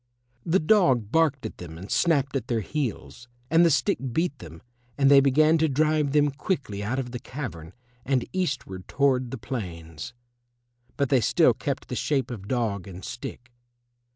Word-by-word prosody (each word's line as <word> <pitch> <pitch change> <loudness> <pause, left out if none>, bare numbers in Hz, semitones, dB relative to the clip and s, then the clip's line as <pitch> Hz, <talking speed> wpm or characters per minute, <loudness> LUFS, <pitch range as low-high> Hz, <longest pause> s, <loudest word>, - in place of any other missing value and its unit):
The 170 +3 +4
dog 140 - +3
barked 150 -6 +2
at 110 - -7
them 80 -2 -9
and 95 +4 -9
snapped 140 -5 +2
at 130 -4 -2
their 115 -2 0
heels, 125 0 -4 0.2
and 165 +1 +6
the 170 - +5
stick 165 +7 +1
beat 160 +2 -1
them, 80 -1 -11 0.3
and 140 -1 +4
they 140 - +9
began 155 +4 +4
to 160 0 +2
drive 150 +1 +1
them 145 0 +3
quickly 135 - -3
out 115 +6 -2
of 125 -2 -3
the 125 - -5
cavern 120 - -7 0.3
and 130 -2 0
eastward 135 - -3
toward 130 -3 +1
the 135 - -5
plains. 85 - -6 0.8
But 140 -2 +1
they 130 -3 +4
still - - +4
kept - - -4
the - - -4
shape 135 -4 -1
of 100 -5 -7
dog 105 -6 -1
and 95 -1 -9
stick. 125 0 -8
130 Hz, 175 wpm, -26 LUFS, 105-150 Hz, 0.8 s, they